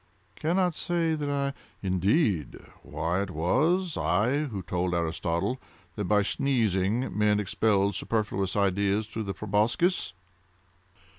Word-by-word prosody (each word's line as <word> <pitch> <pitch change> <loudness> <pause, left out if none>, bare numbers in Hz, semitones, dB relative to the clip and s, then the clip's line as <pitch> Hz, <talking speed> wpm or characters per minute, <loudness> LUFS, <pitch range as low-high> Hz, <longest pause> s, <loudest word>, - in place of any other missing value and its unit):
"Cannot 180 +2 +1
say 170 0 0
that 150 -2 -2
I—" 140 -1 -1 0.3
"Indeed!—why 90 - -1
it 100 - -3
was 155 - +1
I 115 - +1
who 105 -9 -5
told 90 0 -1
Aristotle 85 +7 -1 0.4
that 105 - -2
by 105 +2 +3
sneezing, 110 -2 0
men 105 0 +3
expelled 100 0 +1
superfluous 105 -4 -1
ideas 100 +1 +1
through 110 +1 -5
the 95 - -4
proboscis." 105 - +1
105 Hz, 115 wpm, -27 LUFS, 95-140 Hz, 0.4 s, by